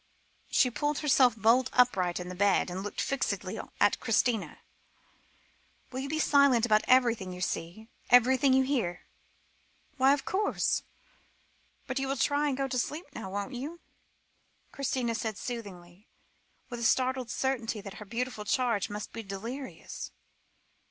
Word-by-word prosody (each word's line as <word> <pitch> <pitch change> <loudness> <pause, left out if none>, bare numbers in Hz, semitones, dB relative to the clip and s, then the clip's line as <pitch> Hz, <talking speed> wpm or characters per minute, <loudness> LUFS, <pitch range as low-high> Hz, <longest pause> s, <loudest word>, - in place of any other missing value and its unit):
She 250 - +3
pulled 295 +4 -1
herself 260 -6 +4
bolt 235 +4 +4
upright 190 -9 +3
in 180 - -6
the 180 - -6
bed, 195 -1 +2
and 185 +2 -4
looked 205 +1 -6
fixedly 275 0 -2 0.2
at - - +3
Christina; 235 -5 0 1.3
"will 260 - -4
you 275 +1 -4
be 310 - -1
silent 280 -6 +4
about 215 -2 +4
everything 235 -7 +3
you 180 - -8
see, 180 +4 -4 0.2
everything 255 +3 +5
you 265 0 +5
hear?" 230 -11 -2 0.9
"Why, 265 +1 +5
of 275 - -8
course. 405 +2 0 1.0
But, 260 -1 -2
you 270 - -2
will 275 +1 -1
try 290 +3 +2
and 270 -3 -1
go 275 0 0
to 255 -1 -1
sleep 305 +7 -3
now, 220 -4 -6
won't 200 +6 -4
you?" 290 +8 -6 0.9
Christina 255 -3 -1
said 220 -2 -3
soothingly, 200 -6 -8 0.6
with 240 - -6
a - - -4
startled 255 +1 +1
certainty 235 -3 -1
that 200 0 -9
her - - -7
beautiful 235 0 -4
charge 230 -2 0
must 210 0 -6
be 230 - -5
delirious. 230 +7 -7
245 Hz, 150 wpm, -29 LUFS, 210-265 Hz, 1.3 s, everything